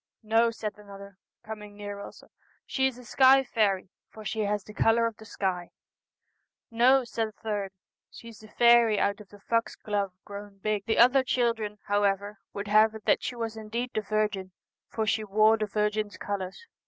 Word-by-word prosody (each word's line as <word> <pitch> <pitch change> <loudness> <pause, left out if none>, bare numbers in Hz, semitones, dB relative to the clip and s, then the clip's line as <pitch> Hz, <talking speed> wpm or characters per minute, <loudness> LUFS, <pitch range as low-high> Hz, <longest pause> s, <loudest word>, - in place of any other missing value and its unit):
' - - -58
No,' 230 +1 +5
said 215 -2 -6
another, 200 -1 -12 0.2
coming 210 -2 -9
near 205 -1 -6
also, 200 - -11 0.2
' - - -37
she 265 -1 +1
is 260 -2 -5
a 250 - -13
sky 265 +3 +5
faery, 200 -6 0 0.2
for 215 -1 -12
she 220 - -3
has 205 0 -1
the 210 - -12
colour 225 +2 +3
of 230 -1 -2
the 220 - -13
sky.' 185 -4 -3 1.0
'No,' 255 +3 +4
said 225 -2 -2
a - - -11
third, 205 -3 -4 0.2
' - - -66
she 230 - -11
is 225 - -13
the 215 - -14
faery 235 -1 +5
out 200 +1 0
of 205 - -15
the 205 - -15
foxglove 205 -3 -2
grown 200 -1 -9
big.' 210 0 -2
The 220 - +1
other 255 +3 +6
children, 230 -5 0
however, 205 0 0
would 200 +1 -6
have 215 +1 +4
it 220 - -10
that - - +3
she 245 +2 -4
was 225 -2 -4
indeed 225 +3 -4
the 215 - 0
Virgin, 210 -3 -2 0.4
for 220 - -2
she 215 +1 0
wore 215 +2 +4
the 215 -1 -2
Virgin's 210 0 -1
colours. 200 - -5
215 Hz, 195 wpm, -28 LUFS, 205-230 Hz, 1.0 s, other